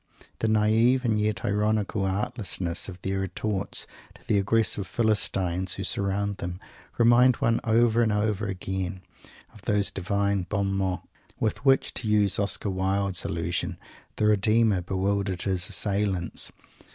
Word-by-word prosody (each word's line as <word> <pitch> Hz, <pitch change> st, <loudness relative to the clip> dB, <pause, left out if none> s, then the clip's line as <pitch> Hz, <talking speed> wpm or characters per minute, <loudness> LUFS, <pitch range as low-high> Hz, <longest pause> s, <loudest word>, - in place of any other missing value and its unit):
The 110 Hz, -, 0 dB
naive, 110 Hz, +4 st, +3 dB
and 110 Hz, -2 st, +2 dB
yet 105 Hz, 0 st, -1 dB
ironical, 105 Hz, -1 st, 0 dB
artlessness 95 Hz, -3 st, -2 dB
of 90 Hz, -1 st, -9 dB
their 95 Hz, 0 st, -1 dB
retorts 95 Hz, +1 st, -3 dB, 0.3 s
to -, -, -19 dB
the 100 Hz, -, +2 dB
aggressive 100 Hz, -1 st, +1 dB
Philistines 95 Hz, -5 st, +1 dB
who 100 Hz, -, -4 dB
surround 100 Hz, 0 st, 0 dB
them 90 Hz, 0 st, -5 dB, 0.4 s
remind 120 Hz, +2 st, +5 dB
one 115 Hz, +1 st, +1 dB
over 115 Hz, +1 st, +3 dB
and 110 Hz, -2 st, +2 dB
over 105 Hz, 0 st, 0 dB
again 95 Hz, -1 st, -4 dB, 0.5 s
of 105 Hz, -, -15 dB
those 105 Hz, 0 st, +1 dB
Divine 100 Hz, 0 st, -1 dB
"bon 100 Hz, -1 st, 0 dB
mots" 95 Hz, -2 st, -1 dB, 0.3 s
with 110 Hz, +2 st, -1 dB
which, 135 Hz, -1 st, +3 dB
to -, -, -3 dB
use 105 Hz, -2 st, +2 dB
Oscar 100 Hz, 0 st, -1 dB
Wilde's 95 Hz, 0 st, -1 dB
allusion, -, -, -2 dB, 0.4 s
the 105 Hz, -, 0 dB
Redeemer 105 Hz, -1 st, +3 dB
bewildered 95 Hz, 0 st, -1 dB
His 95 Hz, -2 st, -1 dB
assailants. 100 Hz, -4 st, -1 dB
100 Hz, 140 wpm, -26 LUFS, 95-110 Hz, 0.5 s, remind